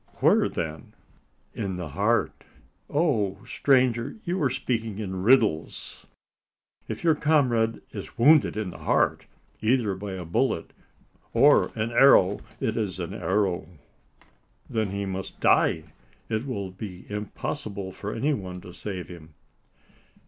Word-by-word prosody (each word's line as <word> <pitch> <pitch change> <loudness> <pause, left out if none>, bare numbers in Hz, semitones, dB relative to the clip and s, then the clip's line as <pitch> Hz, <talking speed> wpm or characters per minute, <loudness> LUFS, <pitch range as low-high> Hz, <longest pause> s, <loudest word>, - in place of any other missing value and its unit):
"Where, - - +3
then?" 80 -1 -5 0.6
"In 95 -2 -3
the 90 -3 -5
heart." - - 0 0.5
"Oh! 135 - +1
stranger, 130 -2 +2
you 180 +1 -2
are 140 - +3
speaking 115 -6 -2
in 95 -3 -4
riddles. 110 -7 +1 0.8
If - - -5
your 165 -2 +5
comrade 130 -8 +2
is - - -8
wounded 145 0 +5
in 105 -4 -2
the - - -11
heart, - - +1 0.3
either 110 -2 +2
by 95 +1 -6
a 90 -2 -6
bullet 85 +2 -1 0.6
or - - +5
an 110 +2 -2
arrow 115 -6 +6
" 110 - -25
"It 110 - -1
is 100 -7 -2
an - - -4
arrow." 95 -2 0 1.0
"Then 110 -3 -1
he 100 +1 -3
must 95 0 -5
die: - - +3 0.5
it 110 +4 -2
will 100 -7 -4
be 95 -1 -8
impossible 100 -1 -4
for 100 +3 -6
any 140 +7 0
one 95 -6 -5
to 90 - -11
save 90 -5 -5
him." 80 -3 -12
105 Hz, 135 wpm, -26 LUFS, 95-120 Hz, 1.0 s, arrow